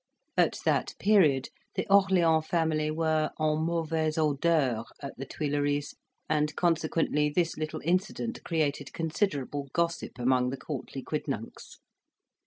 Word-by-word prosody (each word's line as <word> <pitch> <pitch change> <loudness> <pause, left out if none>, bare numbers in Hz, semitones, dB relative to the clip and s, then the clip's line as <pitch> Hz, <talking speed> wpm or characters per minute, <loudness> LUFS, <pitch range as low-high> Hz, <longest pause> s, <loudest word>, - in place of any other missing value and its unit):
At - - +3
that - - +1
period, 155 -11 +4 0.3
the - - -1
Orleans 180 -5 +4
family 160 -2 +1
were 155 0 +1
en 155 0 +1
mauvais 160 -1 0
odeur 145 -6 +2 0.2
at 140 - -7
the 135 +1 -6
Tuileries, 145 0 -1 0.3
and 150 -1 +1
consequently, 160 -3 +1
this 165 +2 0
little 155 0 -4
incident 185 +7 -1
created 150 -4 -1
considerable 150 -5 -1
gossip 170 -4 -1
among 125 0 +2
the 135 - -4
courtly - - -6
quidnuncs. - - -5
155 Hz, 120 wpm, -29 LUFS, 145-165 Hz, 0.3 s, period